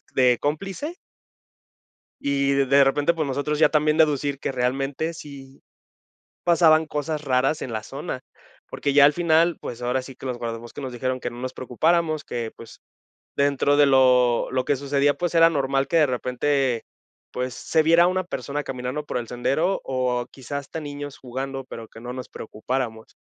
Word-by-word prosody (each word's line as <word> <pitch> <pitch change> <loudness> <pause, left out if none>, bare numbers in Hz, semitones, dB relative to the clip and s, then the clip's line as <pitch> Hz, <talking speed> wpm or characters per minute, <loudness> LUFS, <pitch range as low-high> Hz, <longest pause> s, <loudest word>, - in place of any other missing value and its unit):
de 125 -2 +4
cómplice 195 - -3 1.3
y 140 0 +1
de 140 0 +4
repente, 145 +4 +2
pues 160 -2 -1
nosotros 145 +2 -1
ya - - +7
también 150 0 +2
deducir 145 -3 +2
que - - -2
realmente 135 +5 -1
si 140 -4 -11 0.8
pasaban 160 -2 +5
cosas 150 0 -3
raras 135 +3 +1
en 120 - -5
la 110 -1 -3
zona, 135 0 -6 0.5
porque 140 -1 -2
ya 145 - +7
al 145 - +6
final, 170 0 +3
pues 120 0 -7
ahora 125 +2 0
sí 130 0 -11
que 135 - -11
los 125 -2 -3
guardabosques 115 +3 -6
nos 130 -2 -5
dijeron 130 +1 -2
que 120 - -3
no 120 - -10
nos 130 0 -4
preocupáramos, 155 +5 0
que 115 -2 -4
pues 115 - -13 0.6
dentro 140 0 +2
de 145 - +7
lo 125 -3 +4
lo 130 0 0
que 145 - +2
sucedía, 140 +1 +2
pues 175 +4 -3
era 165 0 +7
normal 135 -2 0
que 170 - +2
de 155 - +6
repente, 125 0 0 0.5
pues 125 0 -3
se 160 +5 +1
viera 170 +2 +5
una 185 0 0
persona 145 -2 -4
caminando 130 +3 -4
por - - -3
el 120 - -4
sendero 140 +10 0
o 125 -2 -1
quizá 140 +2 -6
hasta 145 +3 -6
niños 145 -1 -7
jugando, 135 +1 -5
pero 115 -3 -9
que 115 - -13
no 125 +1 -6
nos 130 0 -7
preocupáramos. 110 0 -4
140 Hz, 175 wpm, -24 LUFS, 125-150 Hz, 1.3 s, ya